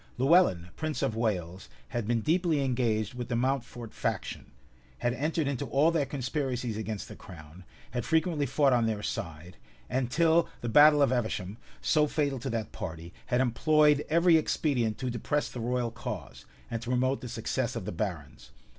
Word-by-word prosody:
Lewellyn, 130 Hz, -, +4 dB
prince 155 Hz, -2 st, -3 dB
of 130 Hz, -5 st, 0 dB
Wales, 95 Hz, -, -2 dB, 0.2 s
had 120 Hz, -3 st, -3 dB
been 115 Hz, -1 st, +1 dB
deeply 165 Hz, -, +1 dB
engaged 120 Hz, -5 st, 0 dB
with 125 Hz, -1 st, -5 dB
the 125 Hz, -, -2 dB
Mountfort 120 Hz, -2 st, -2 dB
faction; -, -, -3 dB, 0.5 s
had 120 Hz, 0 st, 0 dB
entered 150 Hz, +4 st, -1 dB
into 140 Hz, -3 st, -2 dB
all 150 Hz, +4 st, +3 dB
their 155 Hz, -5 st, 0 dB
conspiracies 130 Hz, -3 st, -2 dB
against 110 Hz, -1 st, -4 dB
the -, -, -10 dB
crown; 80 Hz, +1 st, -13 dB, 0.3 s
had 120 Hz, -2 st, -2 dB
frequently 160 Hz, -1 st, +1 dB
fought 140 Hz, +1 st, +3 dB
on 120 Hz, -2 st, +3 dB
their 105 Hz, -2 st, -2 dB
side; 85 Hz, -1 st, -5 dB, 0.3 s
and, 130 Hz, -1 st, 0 dB
till 165 Hz, +4 st, +3 dB
the 120 Hz, -, -3 dB
battle 150 Hz, +3 st, +7 dB
of 135 Hz, -, +3 dB
Evesham, 110 Hz, -4 st, -2 dB, 0.2 s
so 150 Hz, -1 st, +3 dB
fatal 145 Hz, -3 st, -1 dB
to 135 Hz, -, -4 dB
that 115 Hz, -2 st, -3 dB
party, 85 Hz, +1 st, -7 dB
had 125 Hz, +1 st, +2 dB
employed 150 Hz, +4 st, +3 dB
every 170 Hz, +1 st, +5 dB
expedient 125 Hz, -8 st, 0 dB
to 130 Hz, -1 st, -3 dB
depress 145 Hz, +5 st, -1 dB
the 125 Hz, -, -6 dB
royal 120 Hz, 0 st, -1 dB
cause, 120 Hz, +1 st, -7 dB, 0.3 s
and 115 Hz, -1 st, -3 dB
to 120 Hz, -, -6 dB
promote 130 Hz, +2 st, +1 dB
the 125 Hz, -, -6 dB
success -, -, -2 dB
of -, -, -4 dB
the -, -, -3 dB
barons. 65 Hz, -, -5 dB
125 Hz, 175 wpm, -29 LUFS, 110-145 Hz, 0.5 s, battle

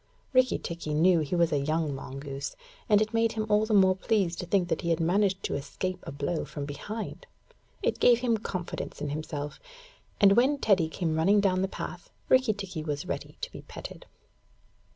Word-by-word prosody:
Rikki 255 Hz, 0 st, +4 dB
tikki 165 Hz, -3 st, -4 dB
knew 170 Hz, +2 st, +5 dB
he 155 Hz, +3 st, -1 dB
was 170 Hz, -1 st, +3 dB
a 145 Hz, -, +2 dB
young 155 Hz, +1 st, 0 dB
mongoose, 135 Hz, +1 st, -6 dB, 0.3 s
and 210 Hz, 0 st, +6 dB
it 215 Hz, -, -7 dB
made 230 Hz, 0 st, +2 dB
him 220 Hz, -1 st, -2 dB
all 210 Hz, +1 st, +3 dB
the 220 Hz, -, 0 dB
more 190 Hz, -1 st, +6 dB
pleased 190 Hz, -3 st, 0 dB
to 180 Hz, -, -4 dB
think 180 Hz, -1 st, +1 dB
that -, -, 0 dB
he 170 Hz, -, -2 dB
had 165 Hz, -, +2 dB
managed 190 Hz, +3 st, +2 dB
to -, -, -2 dB
escape 185 Hz, +6 st, -3 dB
a -, -, -4 dB
blow 145 Hz, +4 st, -2 dB
from 145 Hz, -2 st, -6 dB
behind. 215 Hz, -, -6 dB, 0.6 s
It -, -, 0 dB
gave 240 Hz, -1 st, +5 dB
him 235 Hz, -3 st, +2 dB
confidence 185 Hz, -4 st, -5 dB
in 145 Hz, 0 st, -3 dB
himself, 150 Hz, 0 st, -5 dB, 0.6 s
and 200 Hz, -1 st, +7 dB
when 255 Hz, +7 st, +4 dB
Teddy 190 Hz, -, +3 dB
came 160 Hz, -1 st, -1 dB
running 195 Hz, +6 st, +4 dB
down 185 Hz, -2 st, +2 dB
the 190 Hz, -, +1 dB
path, -, -, -7 dB, 0.2 s
Rikki 255 Hz, -4 st, +4 dB
tikki 190 Hz, -5 st, -6 dB
was 150 Hz, +1 st, -3 dB
ready -, -, -5 dB
to -, -, -4 dB
be -, -, -9 dB
petted. -, -, -10 dB
185 Hz, 195 wpm, -28 LUFS, 155-210 Hz, 0.6 s, and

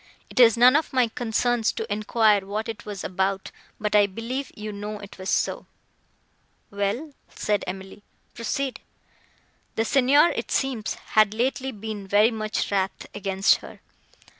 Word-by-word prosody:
It -, -, -3 dB
is 235 Hz, -2 st, +7 dB
none 250 Hz, +3 st, +7 dB
of 310 Hz, -, +1 dB
my 250 Hz, -3 st, +3 dB
concerns 235 Hz, 0 st, 0 dB
to 450 Hz, -, -4 dB
enquire 215 Hz, -1 st, +3 dB
what 210 Hz, +3 st, -4 dB
it 225 Hz, 0 st, -7 dB
was 200 Hz, -3 st, -5 dB
about, 190 Hz, +1 st, -1 dB, 0.3 s
but 210 Hz, 0 st, -1 dB
I 205 Hz, -1 st, +6 dB
believe 235 Hz, +7 st, -5 dB
you 215 Hz, 0 st, -6 dB
know 210 Hz, +1 st, -5 dB
it 200 Hz, -1 st, -12 dB
was 185 Hz, -, -4 dB
so." -, -, 0 dB, 1.0 s
"Well," 205 Hz, +9 st, -2 dB, 0.2 s
said 210 Hz, -1 st, -1 dB
Emily, 190 Hz, +2 st, -7 dB, 0.3 s
"proceed." 260 Hz, +3 st, -3 dB, 1.0 s
"The 225 Hz, -, +1 dB
Signor, 280 Hz, +6 st, +5 dB
it -, -, -4 dB
seems, 260 Hz, -6 st, -1 dB, 0.2 s
had 215 Hz, -1 st, +4 dB
lately 260 Hz, +3 st, -1 dB
been 210 Hz, -3 st, -7 dB
very 210 Hz, +4 st, +4 dB
wrath 210 Hz, -3 st, -2 dB
against 195 Hz, -1 st, +2 dB
her. -, -, -12 dB
215 Hz, 145 wpm, -25 LUFS, 200-245 Hz, 1.0 s, is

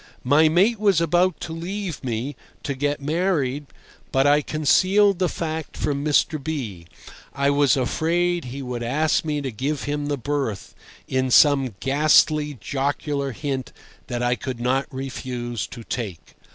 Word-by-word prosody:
My 150 Hz, +4 st, +5 dB
mate 200 Hz, +7 st, +3 dB
was 200 Hz, -5 st, +3 dB
about 175 Hz, +2 st, +2 dB
to 160 Hz, -, -5 dB
leave 180 Hz, 0 st, -5 dB
me 125 Hz, +3 st, -3 dB, 0.3 s
(to 140 Hz, -, -2 dB
get 145 Hz, +2 st, -2 dB
married), 150 Hz, -4 st, 0 dB, 0.4 s
but 135 Hz, +1 st, +3 dB
I 145 Hz, +1 st, +5 dB
concealed 185 Hz, +7 st, +3 dB
the 180 Hz, -2 st, +2 dB
fact 160 Hz, -1 st, -4 dB
from 140 Hz, -1 st, -1 dB
Mr. 150 Hz, 0 st, +1 dB
B—. 115 Hz, -, -5 dB, 0.5 s
I 140 Hz, +1 st, +2 dB
was 140 Hz, -2 st, +3 dB
afraid 170 Hz, +6 st, 0 dB
he 135 Hz, +3 st, -6 dB
would 125 Hz, -2 st, -4 dB
ask 150 Hz, +7 st, +1 dB
me 150 Hz, -2 st, -2 dB
to 135 Hz, -2 st, -3 dB
give 135 Hz, +6 st, -3 dB
him 145 Hz, 0 st, -2 dB
the 145 Hz, -1 st, -1 dB
berth 135 Hz, -6 st, -3 dB, 0.3 s
in 130 Hz, 0 st, 0 dB
some 135 Hz, -4 st, +5 dB
ghastly 150 Hz, +1 st, +3 dB
jocular 140 Hz, +2 st, -2 dB
hint 135 Hz, +1 st, -4 dB, 0.3 s
that 120 Hz, -1 st, -3 dB
I 120 Hz, 0 st, +2 dB
could 125 Hz, 0 st, -5 dB
not 130 Hz, +3 st, 0 dB
refuse 125 Hz, -4 st, -4 dB
to 115 Hz, -, -10 dB
take. 105 Hz, -8 st, -6 dB
145 Hz, 150 wpm, -23 LUFS, 130-160 Hz, 0.5 s, My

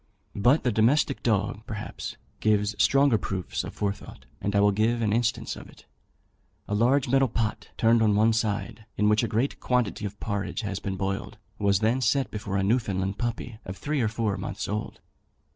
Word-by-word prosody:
But 125 Hz, +9 st, +3 dB
the 125 Hz, -, +2 dB
domestic 130 Hz, +6 st, +2 dB
dog, 105 Hz, -2 st, 0 dB
perhaps, 105 Hz, -1 st, -6 dB, 0.2 s
gives 105 Hz, -1 st, +2 dB
stronger 135 Hz, -1 st, +4 dB
proofs 95 Hz, -3 st, -3 dB
of -, -, -8 dB
forethought; 100 Hz, -1 st, -4 dB, 0.2 s
and 100 Hz, 0 st, -1 dB
I -, -, +5 dB
will 100 Hz, 0 st, +5 dB
give 110 Hz, +4 st, +1 dB
an 110 Hz, -3 st, +1 dB
instance 115 Hz, -1 st, 0 dB
of -, -, -11 dB
it. -, -, -18 dB, 0.8 s
A -, -, -3 dB
large 125 Hz, +6 st, +3 dB
metal 135 Hz, +1 st, +4 dB
pot, 110 Hz, -2 st, -2 dB
turned 115 Hz, 0 st, +4 dB
on 105 Hz, -2 st, +4 dB
one 110 Hz, +2 st, +4 dB
side, 110 Hz, 0 st, -2 dB
in 105 Hz, 0 st, +3 dB
which 105 Hz, 0 st, +4 dB
a 115 Hz, -, 0 dB
great 115 Hz, +6 st, -1 dB
quantity 125 Hz, -4 st, 0 dB
of 100 Hz, 0 st, -6 dB
porridge 100 Hz, +2 st, -3 dB
had 100 Hz, -3 st, -4 dB
been 95 Hz, -1 st, -3 dB
boiled, 95 Hz, +1 st, -3 dB, 0.2 s
was 100 Hz, 0 st, +2 dB, 0.2 s
set 135 Hz, +3 st, +1 dB
before 100 Hz, -2 st, -3 dB
a 95 Hz, -, +1 dB
Newfoundland 100 Hz, -3 st, 0 dB
puppy 120 Hz, -1 st, -3 dB
of 95 Hz, +1 st, -7 dB
three 145 Hz, -2 st, -1 dB
or 115 Hz, -, +2 dB
four 110 Hz, -2 st, -1 dB
months 100 Hz, +2 st, -4 dB
old. 105 Hz, +1 st, -4 dB
110 Hz, 185 wpm, -27 LUFS, 100-120 Hz, 0.8 s, I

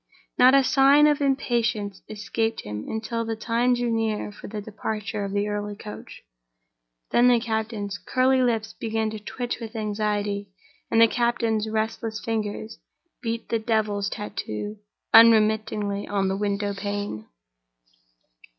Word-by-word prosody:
Not 255 Hz, +2 st, +6 dB
a 275 Hz, -, +6 dB
sign 275 Hz, +3 st, +5 dB
of 295 Hz, -1 st, +3 dB
impatience 235 Hz, -7 st, 0 dB
escaped 225 Hz, +2 st, -2 dB
him 105 Hz, 0 st, -6 dB
until 230 Hz, +1 st, -2 dB
the 225 Hz, 0 st, -3 dB
time 235 Hz, +3 st, +1 dB
drew 240 Hz, -1 st, -1 dB
near 220 Hz, -2 st, -1 dB
for 205 Hz, -, -11 dB
the 210 Hz, +1 st, -5 dB
departure 210 Hz, 0 st, -4 dB
of 200 Hz, -, -4 dB
the 205 Hz, +1 st, 0 dB
early 205 Hz, 0 st, -3 dB
coach. 210 Hz, 0 st, -10 dB, 0.9 s
Then 240 Hz, +1 st, +5 dB
the 245 Hz, -1 st, +5 dB
captain's 220 Hz, -3 st, -3 dB
curly 260 Hz, +2 st, +2 dB
lips 225 Hz, -3 st, 0 dB
began 220 Hz, -1 st, -2 dB
to 215 Hz, -, -6 dB
twitch 245 Hz, +4 st, -4 dB
with 230 Hz, -1 st, -8 dB
anxiety, 205 Hz, -1 st, -2 dB, 0.4 s
and 225 Hz, -, +3 dB
the 230 Hz, -, +8 dB
captain's 230 Hz, -2 st, 0 dB
restless 220 Hz, 0 st, -2 dB
fingers 220 Hz, 0 st, -4 dB, 0.4 s
beat 230 Hz, -1 st, -4 dB
the 230 Hz, -, +1 dB
devil's 215 Hz, -3 st, 0 dB
tattoo 205 Hz, -, -5 dB, 0.3 s
unremittingly 215 Hz, -2 st, +5 dB
on 195 Hz, -2 st, 0 dB
the 190 Hz, -, 0 dB
window 200 Hz, 0 st, -1 dB
pane. 205 Hz, -, -4 dB
220 Hz, 140 wpm, -25 LUFS, 205-230 Hz, 0.9 s, the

